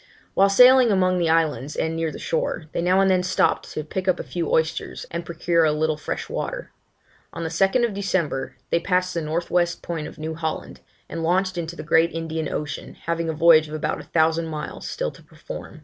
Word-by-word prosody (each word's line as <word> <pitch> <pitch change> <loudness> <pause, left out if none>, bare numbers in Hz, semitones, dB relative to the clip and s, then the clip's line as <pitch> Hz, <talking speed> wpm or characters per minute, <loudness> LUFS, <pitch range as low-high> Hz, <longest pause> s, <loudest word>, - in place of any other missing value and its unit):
While 195 +1 +4
sailing 250 +4 +7
among 185 -2 +2
the 170 -2 +1
islands 155 -4 +1
and 160 0 -1
near 165 -1 -1
the - - -8
shore, 165 0 -2
they - - -2
now 185 +2 +3
and 195 -1 +4
then 185 -1 +3
stopped 185 +1 +1
to 155 - -3
pick 185 +5 -4
up 185 - +2
a - - -3
few 170 -3 -3
oysters, 160 0 -1
and 170 +1 -3
procure 170 0 +1
a 155 - +4
little 155 +1 0
fresh 150 - -5
water. - - -4 0.6
On 170 - -5
the 160 - -2
2nd 195 +6 +2
September, 175 -9 -1 0.2
they 170 - +3
passed 185 +1 0
the 170 - -1
north 160 +3 -3
west 175 -1 +1
point 165 -3 -4
of - - -11
New 160 +1 -4
Holland, 160 -1 -4 0.3
and 165 - -5
launched 185 +3 +1
into 170 -1 -4
the 155 - -7
great 165 +2 +3
Indian 160 -1 -3
Ocean, 150 -1 -5
having 165 0 -1
a - - -1
voyage 160 0 +6
of 150 - -6
about 155 0 -2
a - - -8
thousand 160 0 +1
miles 155 -1 -6
still - - -3
to - - -16
perform. - - -10
165 Hz, 215 wpm, -23 LUFS, 160-185 Hz, 0.6 s, sailing